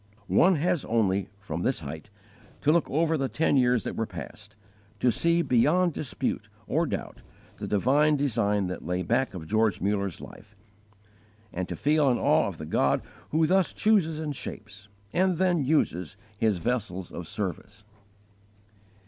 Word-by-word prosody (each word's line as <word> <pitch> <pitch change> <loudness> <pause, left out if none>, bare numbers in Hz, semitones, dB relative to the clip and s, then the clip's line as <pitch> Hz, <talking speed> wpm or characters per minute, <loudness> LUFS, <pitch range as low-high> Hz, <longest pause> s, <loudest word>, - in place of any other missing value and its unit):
One 185 - +4
has 170 0 0
only, 100 -4 +1
from 90 -5 -5
this 130 +2 0
height, 80 +6 -8 0.5
to 150 - +3
look 170 +1 +2
over 160 +2 +1
the 135 -2 -1
ten 160 -2 +1
years 125 -3 +3
that - - -4
were 115 - -2
past, 105 +3 -10 0.4
to 125 - +3
see 170 +8 +2
beyond 160 +9 +3
dispute 140 - -3 0.2
or - - 0
doubt - - -5 0.4
the - - -5
divine 140 +9 +3
design 105 -8 +1
that 90 -1 -5
lay 90 +2 -2
back 120 0 0
of 85 -3 -6
George 110 +4 +1
Mullers 100 -2 -1
life, - - -13 1.0
and 90 0 -3
to 90 - -3
feel 150 - +2
an 120 - +2
awe - - +3
of - - -6
the 80 - -7
God - - +1 0.3
who 160 +1 +2
thus 190 +2 +2
chooses 185 -8 +2
and 150 -2 -3
shapes, 105 -4 -9 0.3
and 185 -1 +2
then 180 -4 +2
uses, 90 - 0 0.2
His 105 -1 +1
vessels 95 -4 -3
of 85 -2 -7
service. 95 -4 -5
120 Hz, 160 wpm, -27 LUFS, 100-155 Hz, 1.0 s, One